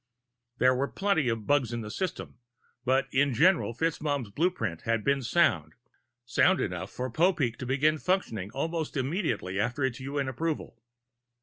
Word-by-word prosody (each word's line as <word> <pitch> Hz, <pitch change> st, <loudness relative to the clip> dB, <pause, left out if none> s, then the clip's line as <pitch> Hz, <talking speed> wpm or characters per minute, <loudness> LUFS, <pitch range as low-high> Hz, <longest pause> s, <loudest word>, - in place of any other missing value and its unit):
There 130 Hz, 0 st, +4 dB
were 135 Hz, +2 st, 0 dB
plenty 175 Hz, -9 st, +1 dB
of 115 Hz, -2 st, -2 dB
bugs 140 Hz, -5 st, +2 dB
in 120 Hz, 0 st, -3 dB
the 105 Hz, -1 st, -6 dB
system, 180 Hz, -, -4 dB, 0.4 s
but 130 Hz, +2 st, +2 dB
in 135 Hz, -1 st, +2 dB
general 170 Hz, -5 st, +3 dB
FitzMaugham's 145 Hz, -6 st, -1 dB
blueprint 115 Hz, -, -1 dB
had 115 Hz, -1 st, 0 dB
been 140 Hz, 0 st, +2 dB
sound 95 Hz, -, +1 dB, 0.5 s
sound 175 Hz, +9 st, +3 dB
enough 90 Hz, 0 st, -3 dB
for 125 Hz, 0 st, -4 dB
Popeek 155 Hz, -5 st, +2 dB
to 130 Hz, -, -6 dB
begin 150 Hz, +4 st, +2 dB
functioning 115 Hz, -, -1 dB
almost 160 Hz, +3 st, -3 dB
immediately 130 Hz, -, -1 dB
after 120 Hz, +6 st, -1 dB
its 130 Hz, -1 st, -1 dB
UN 140 Hz, +1 st, -2 dB
approval. 155 Hz, +5 st, -3 dB
130 Hz, 150 wpm, -28 LUFS, 115-160 Hz, 0.5 s, There